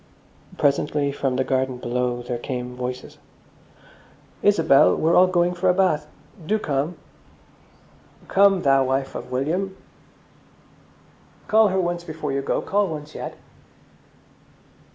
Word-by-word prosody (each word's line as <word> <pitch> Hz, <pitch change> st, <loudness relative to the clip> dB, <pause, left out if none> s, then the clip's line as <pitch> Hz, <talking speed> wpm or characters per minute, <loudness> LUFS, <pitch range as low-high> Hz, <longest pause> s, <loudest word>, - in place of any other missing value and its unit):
Presently 140 Hz, 0 st, +1 dB
from 135 Hz, -2 st, -2 dB
the 130 Hz, -, +1 dB
garden 130 Hz, -1 st, -1 dB
below 125 Hz, 0 st, -2 dB
there 120 Hz, 0 st, -4 dB
came 125 Hz, -1 st, -5 dB
voices. 125 Hz, 0 st, -6 dB, 1.2 s
"Isabel, 90 Hz, -, +4 dB
we're 165 Hz, +2 st, +1 dB
all 185 Hz, +1 st, +6 dB
going 175 Hz, -1 st, +1 dB
for 180 Hz, +1 st, 0 dB
a 180 Hz, -, +3 dB
bathe. 170 Hz, -6 st, +2 dB, 0.4 s
Do 210 Hz, +7 st, 0 dB
come!" 150 Hz, -2 st, -2 dB, 1.3 s
"Come, 195 Hz, -1 st, +4 dB
thou 135 Hz, -1 st, +4 dB
wife 135 Hz, +1 st, -1 dB
of -, -, -7 dB
William!" 175 Hz, +9 st, -2 dB, 1.7 s
"Call 220 Hz, 0 st, +5 dB
her 190 Hz, -1 st, 0 dB
once 175 Hz, -1 st, -2 dB
before 155 Hz, -3 st, -5 dB
you 135 Hz, 0 st, -1 dB
go, 135 Hz, -, -2 dB
call 205 Hz, 0 st, +1 dB
once 150 Hz, -2 st, -7 dB
yet!" -, -, -7 dB
150 Hz, 125 wpm, -23 LUFS, 130-180 Hz, 1.7 s, all